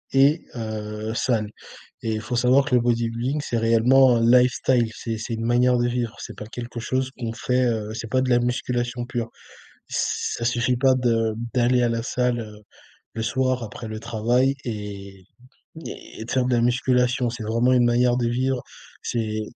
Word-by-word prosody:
et 140 Hz, +4 st, +4 dB
heu, 110 Hz, -1 st, -4 dB
salle 110 Hz, -5 st, 0 dB, 0.5 s
et 110 Hz, -1 st, -1 dB
il 110 Hz, -, -2 dB
faut 120 Hz, +3 st, -5 dB
savoir 125 Hz, +3 st, +4 dB
que 130 Hz, -3 st, -1 dB
le 125 Hz, -, +5 dB
bodybuilding, 120 Hz, +4 st, 0 dB
c'est 120 Hz, -, -1 dB
réellement 120 Hz, +3 st, +5 dB
un -, -, +1 dB
lifestyle, 125 Hz, 0 st, +3 dB
c'est 115 Hz, -1 st, -4 dB
c'est 115 Hz, +1 st, -4 dB
une 115 Hz, -, -4 dB
manière 125 Hz, +1 st, +3 dB
de 120 Hz, -, +2 dB
vivre, 120 Hz, -2 st, -2 dB
c'est -, -, -8 dB
pas 105 Hz, -, -8 dB
quelque 120 Hz, +1 st, -7 dB
chose 130 Hz, +2 st, -1 dB
qu'on 115 Hz, -3 st, -3 dB
fait, 125 Hz, +2 st, 0 dB
heu, 110 Hz, -2 st, -1 dB
c'est 115 Hz, 0 st, -5 dB
pas 130 Hz, -, +2 dB
de 130 Hz, -, -1 dB
la 120 Hz, -, +5 dB
musculation 120 Hz, 0 st, -2 dB
pure. 120 Hz, -2 st, -3 dB, 0.6 s
Ça 120 Hz, -, -2 dB
suffit 120 Hz, +1 st, +1 dB
pas 130 Hz, 0 st, +4 dB
de 115 Hz, -3 st, +1 dB, 0.2 s
d'aller 125 Hz, 0 st, +3 dB
à 120 Hz, -, +2 dB
la 115 Hz, 0 st, -1 dB
salle, 125 Hz, 0 st, 0 dB
heu, 105 Hz, -2 st, -8 dB, 0.6 s
le 115 Hz, -, -4 dB
soir 130 Hz, +1 st, 0 dB
après 110 Hz, +1 st, -7 dB
le 110 Hz, 0 st, -6 dB
travail 120 Hz, +4 st, +1 dB
et 100 Hz, -4 st, -7 dB, 0.6 s
et 110 Hz, -, -8 dB
de -, -, -7 dB
faire 130 Hz, -1 st, +2 dB
de 125 Hz, -, +1 dB
la 120 Hz, -, +2 dB
musculation, 125 Hz, 0 st, +2 dB
c'est 115 Hz, -1 st, -6 dB
vraiment 115 Hz, +4 st, +2 dB
une 125 Hz, -1 st, +4 dB
manière 120 Hz, +1 st, +3 dB
de 120 Hz, -2 st, 0 dB
vivre, 130 Hz, +1 st, 0 dB, 0.4 s
c'est 110 Hz, -2 st, -2 dB
120 Hz, 185 wpm, -23 LUFS, 115-125 Hz, 0.6 s, le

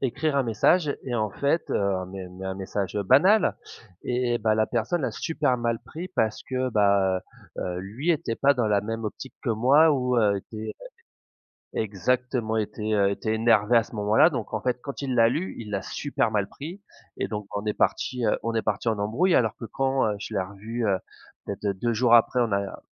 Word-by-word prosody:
écrire 140 Hz, +3 st, -1 dB
un 140 Hz, -, +3 dB
message 145 Hz, +8 st, +2 dB
et 125 Hz, -3 st, -4 dB
en 110 Hz, -2 st, 0 dB
fait 140 Hz, -, 0 dB
heu, 95 Hz, -2 st, 0 dB
mais 95 Hz, -1 st, -7 dB
mais 95 Hz, +1 st, -8 dB
un 95 Hz, -, -3 dB
message, 95 Hz, 0 st, -4 dB
heu, 100 Hz, -, 0 dB
banal, 180 Hz, -, +5 dB, 0.5 s
eh 120 Hz, -1 st, 0 dB
bah 110 Hz, -1 st, +2 dB
la 110 Hz, 0 st, +2 dB
personne 125 Hz, +7 st, -1 dB
a 125 Hz, -, 0 dB
super 145 Hz, +1 st, -1 dB
mal 115 Hz, -1 st, 0 dB
pris 170 Hz, +4 st, -7 dB
parce 110 Hz, -12 st, -1 dB
que 130 Hz, 0 st, -2 dB
bah 100 Hz, -3 st, +3 dB, 0.4 s
heu, -, -, -1 dB
heu, 90 Hz, -1 st, -3 dB
lui 115 Hz, -, -2 dB
était 155 Hz, -8 st, -1 dB
pas 140 Hz, +1 st, +4 dB
dans 120 Hz, -4 st, 0 dB
la 105 Hz, -1 st, +2 dB
même 115 Hz, +2 st, -4 dB
optique 120 Hz, +5 st, -6 dB
que 125 Hz, -, -1 dB
moi 135 Hz, +8 st, +5 dB
ou 125 Hz, -2 st, 0 dB
heu, 105 Hz, -3 st, +3 dB
était 110 Hz, +2 st, -7 dB
heu -, -, -9 dB, 0.9 s
exactement, 110 Hz, +3 st, -1 dB
était 110 Hz, 0 st, -2 dB
heu, 100 Hz, -1 st, +3 dB
était 110 Hz, +2 st, -2 dB
énervé 110 Hz, 0 st, +3 dB
à 115 Hz, -, +6 dB
ce 115 Hz, -, -14 dB
moment-là. 105 Hz, +9 st, +4 dB
Donc 120 Hz, -7 st, -4 dB
en 110 Hz, -, -2 dB
fait 125 Hz, 0 st, 0 dB
quand 140 Hz, 0 st, -6 dB
il 135 Hz, -2 st, -2 dB
l'a 115 Hz, -1 st, +5 dB
lu, 160 Hz, +10 st, -2 dB
il 110 Hz, -3 st, -7 dB
l'a 100 Hz, -2 st, -2 dB
super 140 Hz, -1 st, -1 dB
mal 105 Hz, -2 st, 0 dB
pris 170 Hz, +8 st, -8 dB, 0.4 s
et -, -, -1 dB
donc 105 Hz, -1 st, -4 dB
on 100 Hz, +1 st, -3 dB
est 105 Hz, -, 0 dB
partis 125 Hz, -2 st, 0 dB
heu, -, -, +2 dB
on 115 Hz, 0 st, -2 dB
est 110 Hz, -, +1 dB
partis 110 Hz, +2 st, -1 dB
en 110 Hz, -2 st, 0 dB
embrouille 120 Hz, -, +1 dB
alors 110 Hz, -4 st, +3 dB
que 115 Hz, -, -6 dB
quand 135 Hz, +1 st, 0 dB
heu, 105 Hz, -, -2 dB
je 110 Hz, -, -7 dB
l'ai 100 Hz, -, +1 dB
revu 105 Hz, +5 st, -4 dB
heu, 100 Hz, -2 st, +2 dB, 0.5 s
peut-être, 100 Hz, +1 st, -5 dB
heu, 100 Hz, -, +1 dB
2 120 Hz, +5 st, -1 dB
jours 120 Hz, +1 st, +4 dB
après 120 Hz, +2 st, +4 dB
on 115 Hz, -3 st, +1 dB
a 100 Hz, 0 st, -2 dB
115 Hz, 220 wpm, -26 LUFS, 105-130 Hz, 0.9 s, à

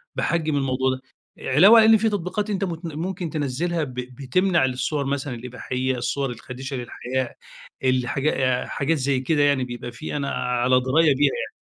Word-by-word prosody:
باحجم 160 Hz, -3 st, 0 dB
الموضوع 130 Hz, -1 st, +1 dB
ده. 130 Hz, 0 st, -4 dB, 0.5 s
علاوة 200 Hz, -, +8 dB
إن 220 Hz, 0 st, +7 dB
في 220 Hz, +1 st, +1 dB
تطبيقات 205 Hz, +1 st, -2 dB
أنت 200 Hz, -2 st, -1 dB
متن 165 Hz, -3 st, -4 dB
ممكن 180 Hz, 0 st, -3 dB
تنزلها 155 Hz, +3 st, -1 dB
ب 130 Hz, -4 st, -6 dB
بتمنع 130 Hz, +7 st, 0 dB
الصور 130 Hz, +3 st, -1 dB
مثلًا 140 Hz, -1 st, -2 dB
الإباحية، 125 Hz, +2 st, -3 dB
الصور 135 Hz, +3 st, -1 dB
الخادشة 130 Hz, +3 st, -7 dB
للحياء، 125 Hz, +1 st, -4 dB, 0.5 s
الحاجا 130 Hz, 0 st, +1 dB
حاجات 155 Hz, +4 st, -1 dB
زي 135 Hz, -1 st, 0 dB
كده 145 Hz, +3 st, +1 dB
يعني 140 Hz, -2 st, +3 dB
بيبقى 120 Hz, -1 st, -6 dB
في 150 Hz, +6 st, -6 dB
أنا 140 Hz, -1 st, -2 dB
على 125 Hz, 0 st, +1 dB
دراية 140 Hz, +4 st, +3 dB
بيها 140 Hz, 0 st, +3 dB
يعني. -, -, -4 dB
135 Hz, 160 wpm, -23 LUFS, 130-165 Hz, 0.5 s, علاوة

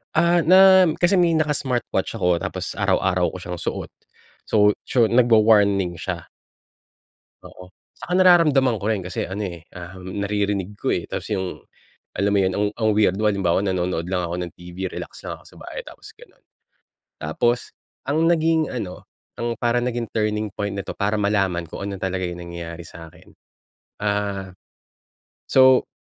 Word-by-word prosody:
Ah, 170 Hz, +2 st, +4 dB
na 190 Hz, +1 st, +7 dB
kasi 180 Hz, +2 st, +3 dB
may 170 Hz, -2 st, +3 dB
naka-smartwatch 145 Hz, -5 st, -1 dB
ako 90 Hz, -1 st, +1 dB
tapos -, -, -4 dB
araw-araw 90 Hz, -1 st, +1 dB
ko -, -, -4 dB
siyang 90 Hz, -1 st, -6 dB
suot. -, -, -4 dB, 0.6 s
So 105 Hz, -1 st, +4 dB, 0.2 s
tso 120 Hz, -3 st, +3 dB
nagwa-warning 105 Hz, -7 st, +4 dB
siya. 90 Hz, -3 st, -5 dB, 1.2 s
Oo, 90 Hz, 0 st, -12 dB, 0.2 s
tsaka 180 Hz, -, -6 dB
nararamdaman 150 Hz, -, +4 dB
ko -, -, -5 dB
rin, 100 Hz, -5 st, -1 dB
kasi 90 Hz, -, -3 dB
ano, 100 Hz, +3 st, -4 dB
eh, 85 Hz, -3 st, -7 dB, 0.2 s
um, 90 Hz, +2 st, -8 dB
naririnig 100 Hz, -1 st, -1 dB
ko, 105 Hz, -, -4 dB
eh, -, -, 0 dB
tapos -, -, -6 dB
yung, 95 Hz, -3 st, -3 dB, 0.6 s
alam 100 Hz, +1 st, +1 dB
mo 100 Hz, -, +3 dB
'yon, 95 Hz, -1 st, +1 dB
ang 105 Hz, -, +1 dB
ang 110 Hz, -1 st, 0 dB
weirdo, 105 Hz, +1 st, +3 dB
halimbawa 95 Hz, -3 st, +1 dB
nanonood 90 Hz, -3 st, -1 dB
lang 90 Hz, -2 st, -1 dB
ako 85 Hz, +1 st, -4 dB
ng 90 Hz, -1 st, -5 dB
TV, 90 Hz, +2 st, -6 dB
relax -, -, -8 dB
lang -, -, -6 dB
ako -, -, -22 dB
sa -, -, -16 dB
bahay, -, -, -7 dB
tapos -, -, -12 dB
gano'n. -, -, -19 dB, 0.8 s
Tapos 120 Hz, +11 st, 0 dB, 0.4 s
ang 155 Hz, +3 st, +2 dB
naging 160 Hz, -2 st, +2 dB
ano 100 Hz, -7 st, -6 dB, 0.3 s
ang 120 Hz, 0 st, -2 dB
parang 120 Hz, 0 st, +1 dB
naging 120 Hz, -2 st, -3 dB
turning 105 Hz, -1 st, -1 dB
point 100 Hz, +1 st, -4 dB
nito 100 Hz, -1 st, -6 dB
para 100 Hz, +1 st, 0 dB
malaman 95 Hz, -5 st, 0 dB
kung 100 Hz, -, -6 dB
ano 100 Hz, -2 st, -6 dB
talaga 95 Hz, 0 st, -2 dB
yung 90 Hz, 0 st, -6 dB
nangyayari 85 Hz, -1 st, -7 dB
sa'kin, 80 Hz, 0 st, -13 dB, 0.8 s
ah 100 Hz, -2 st, -2 dB, 1.0 s
so 130 Hz, -1 st, +5 dB
100 Hz, 155 wpm, -22 LUFS, 90-120 Hz, 1.2 s, na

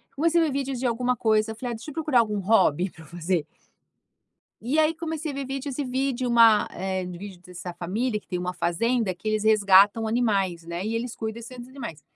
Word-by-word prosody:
comecei 335 Hz, +4 st, +3 dB
a -, -, +4 dB
ver 300 Hz, -, -1 dB
vídeos 270 Hz, -2 st, -2 dB
de 255 Hz, -, -3 dB
alguma 245 Hz, +1 st, +1 dB
coisa. 220 Hz, -1 st, +2 dB
Eu 220 Hz, -, -7 dB
falei: 245 Hz, +1 st, -4 dB
"Ah, -, -, -4 dB
deixa 225 Hz, +7 st, -9 dB
eu -, -, -11 dB
procurar 300 Hz, -5 st, +2 dB
algum 210 Hz, -3 st, +1 dB
hobby 185 Hz, -3 st, +3 dB
para 160 Hz, 0 st, -15 dB
fazer". 170 Hz, -2 st, -2 dB, 1.2 s
E 265 Hz, +7 st, -1 dB
aí, 315 Hz, +1 st, +4 dB
comecei 320 Hz, -2 st, -4 dB
a -, -, -8 dB
ver 275 Hz, 0 st, -3 dB
vídeos 270 Hz, 0 st, -4 dB
e 285 Hz, -, 0 dB
vi 260 Hz, +2 st, -1 dB
de 250 Hz, +1 st, -2 dB
uma, 230 Hz, -3 st, +6 dB
eh, 190 Hz, 0 st, -3 dB
de 180 Hz, -1 st, -7 dB
vídeo 190 Hz, -2 st, -9 dB
dessa 180 Hz, -1 st, -8 dB
família 210 Hz, +7 st, -2 dB
que -, -, -21 dB
tem 180 Hz, -1 st, -3 dB
uma 180 Hz, 0 st, -3 dB
fazenda, 220 Hz, +4 st, 0 dB
que 195 Hz, +5 st, -6 dB
eles 215 Hz, 0 st, 0 dB
resgatam 205 Hz, +1 st, +5 dB
animais, 200 Hz, -7 st, 0 dB
né? 170 Hz, +3 st, -5 dB
E 225 Hz, +1 st, -2 dB
eles 235 Hz, +1 st, -3 dB
cuidam 220 Hz, -1 st, -4 dB
desses 235 Hz, +2 st, -10 dB, 0.2 s
animais. 235 Hz, -, -8 dB
220 Hz, 225 wpm, -25 LUFS, 185-255 Hz, 1.2 s, uma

